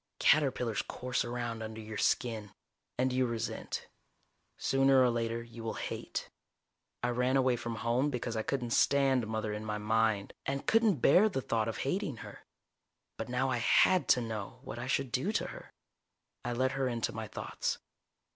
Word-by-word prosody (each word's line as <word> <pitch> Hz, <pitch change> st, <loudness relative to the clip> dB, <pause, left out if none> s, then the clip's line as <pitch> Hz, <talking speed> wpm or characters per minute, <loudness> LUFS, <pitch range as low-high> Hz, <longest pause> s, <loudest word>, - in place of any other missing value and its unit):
Caterpillars 130 Hz, -7 st, +3 dB
course 125 Hz, 0 st, -2 dB
around 120 Hz, -1 st, -3 dB
under 110 Hz, 0 st, -6 dB
your 110 Hz, -1 st, -6 dB
skin. 110 Hz, -5 st, 0 dB, 0.4 s
And 130 Hz, 0 st, +1 dB
you 130 Hz, 0 st, +2 dB
resent. 115 Hz, -1 st, -4 dB, 0.7 s
Sooner 135 Hz, 0 st, +4 dB
or 125 Hz, -1 st, +5 dB
later 115 Hz, 0 st, -1 dB
you 115 Hz, 0 st, -10 dB
will 110 Hz, -, -3 dB
hate. -, -, -4 dB, 0.8 s
I 120 Hz, -, +2 dB
ran 125 Hz, +2 st, +2 dB
away 130 Hz, -2 st, +3 dB
from 120 Hz, -1 st, -4 dB
home 120 Hz, +5 st, +1 dB
because 125 Hz, -3 st, -3 dB
I 110 Hz, -, 0 dB
couldn't 120 Hz, 0 st, -2 dB
stand 135 Hz, -3 st, +3 dB
Mother 110 Hz, -1 st, -2 dB
in 105 Hz, +1 st, -4 dB
my 105 Hz, -1 st, -2 dB
mind, 110 Hz, -1 st, +1 dB
and 135 Hz, 0 st, -2 dB
couldn't 220 Hz, -, +3 dB
bear 195 Hz, +9 st, +6 dB
the 180 Hz, -, -2 dB
thought 115 Hz, -3 st, 0 dB
of 115 Hz, -, -3 dB
hating 170 Hz, -, -1 dB
her. 105 Hz, -, -10 dB, 0.8 s
But -, -, -5 dB
now 130 Hz, +1 st, +1 dB
I 125 Hz, -, +1 dB
had 180 Hz, +9 st, +4 dB
to -, -, 0 dB
know 110 Hz, -3 st, -5 dB
what 120 Hz, -, -6 dB
I 125 Hz, -, -4 dB
should 135 Hz, -1 st, 0 dB
do 150 Hz, -, 0 dB
to -, -, 0 dB
her. -, -, -11 dB, 0.7 s
I 120 Hz, -, -2 dB
let 130 Hz, +2 st, +1 dB
her 135 Hz, -1 st, 0 dB
into 120 Hz, -2 st, -1 dB
my 110 Hz, 0 st, -5 dB
thoughts. -, -, -3 dB
120 Hz, 175 wpm, -32 LUFS, 110-135 Hz, 0.8 s, bear